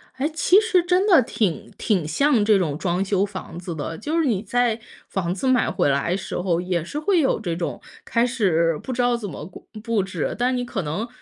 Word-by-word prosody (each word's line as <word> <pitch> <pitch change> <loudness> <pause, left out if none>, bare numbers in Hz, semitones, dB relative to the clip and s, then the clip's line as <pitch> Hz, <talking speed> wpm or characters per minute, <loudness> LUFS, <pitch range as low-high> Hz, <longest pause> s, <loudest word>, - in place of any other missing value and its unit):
哎， 265 +3 0
其 365 +5 +5
实 435 -5 +3
真 360 +2 +2
的 360 -10 +6
挺 205 -7 -2
挺 185 -8 0
像 255 - +2
这 210 -1 +4
种 155 -6 -1
装 180 +2 0
修 195 0 +1
房 190 -4 -8
子 175 -2 -6
的。 160 +2 -5
就 305 +9 -1
是 325 - +2
你 220 -8 +1
在 235 +1 0 0.3
房 180 -2 -1
子 200 +7 -3
买 255 -7 +3
回 175 -3 +1
来 140 +6 +1
时 190 - -5
候 175 -2 0
也 180 -3 -1
是 290 - -5
会 360 +3 +2
有 270 -8 +2
这 175 -6 -3
种 170 0 -4 0.2
开 235 +1 +2
始 170 -10 +1
不 260 - -5
知 250 - 0
道 245 0 +2
怎 220 -4 -5
么 155 - -7
顾 180 - -13 0.2
布 230 -3 +1
置， 190 -5 -3
但 245 +1 +1
是 260 - 0
你 245 0 -2
可 230 -5 -3
能， 170 +8 -3
205 Hz, 250 characters per minute, -23 LUFS, 175-255 Hz, 0.3 s, 的